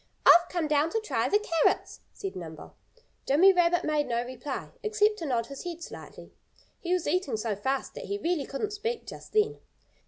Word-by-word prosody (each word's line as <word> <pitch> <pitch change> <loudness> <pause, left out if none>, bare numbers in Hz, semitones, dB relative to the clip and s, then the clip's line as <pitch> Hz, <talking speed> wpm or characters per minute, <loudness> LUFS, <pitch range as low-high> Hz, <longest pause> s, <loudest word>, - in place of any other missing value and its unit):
"I've 345 0 +8
come 345 -4 -1
down 300 +1 +2
to 450 - +2
try 435 - -1
the 410 - +5
carrots," 335 -7 0
said 390 - -6
Nimble. 160 -3 -9 0.5
Jimmy 355 +8 +6
Rabbit 350 -1 +3
made 300 -1 0
no 235 0 -1
reply, 255 +2 -6
except 430 -1 +2
to 330 - -4
nod 235 -4 0
his 275 +3 -8
head 345 -1 -6
slightly. - - -11 0.5
He 350 - -4
was 365 -2 +1
eating 295 -7 0
so 215 -1 -2
fast 265 +7 -2
that - - -7
he 405 - -2
really 335 -7 -1
couldn't 410 +10 -3
speak 455 +3 -3
just - - -10
then. 430 0 +2
335 Hz, 190 wpm, -28 LUFS, 270-400 Hz, 0.5 s, I've